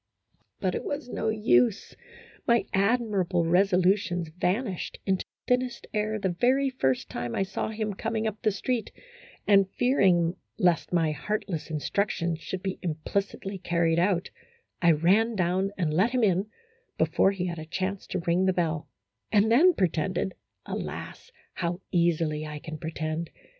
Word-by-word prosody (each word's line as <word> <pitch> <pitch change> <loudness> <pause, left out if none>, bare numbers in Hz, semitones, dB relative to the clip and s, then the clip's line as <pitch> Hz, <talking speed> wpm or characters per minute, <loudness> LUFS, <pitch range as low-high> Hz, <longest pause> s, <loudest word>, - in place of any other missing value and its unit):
But 185 -1 0
it - - -3
was 285 -3 -4
no 220 - -1
use, 220 0 +2 0.5
my 235 -4 +4
admirable 195 -4 +1
resolutions 180 0 +2
van 180 +9 0
ished 185 -6 -5
into 190 -1 0 0.2
thinnest 250 0 0
air 215 0 0
the 195 -2 -1
very 270 +2 +3
first 130 - 0
time 120 -1 -4
I - - +1
saw 195 - -3
him 215 -1 -3
coming 220 +2 -2
up 215 -1 -3
the 215 - +3
street, 225 +3 -2 0.5
and, 195 -2 +5
fearing 185 -9 +2 0.2
lest 180 -5 +2
my 165 -3 +2
heartless 175 0 -3
instructions 170 +1 -1
should 185 +2 -5
be 190 -1 -3
implicitly 195 +4 -3
carried 170 -2 +1
out, 180 0 +1 0.5
I 170 -2 +6
ran 200 +9 +3
down 185 +1 +1
and 165 -5 0
let 190 +9 +3
him 250 -1 0
in 195 0 +2 0.5
before - - +3
he 190 -2 -2
had 170 -2 -4
a 155 - -6
chance 185 +3 -3
to 185 - -2
ring 175 +2 +2
the 190 - +3
bell, 165 -3 -1 0.4
and 210 +2 +4
then 340 +9 +6
pretended 185 +1 0 0.3
(alas, 475 - -6 0.2
how 175 0 -2
easily 165 -3 +1
I 150 0 -6
can 155 0 -7
pretend!) 160 0 -3
190 Hz, 155 wpm, -27 LUFS, 170-215 Hz, 0.5 s, I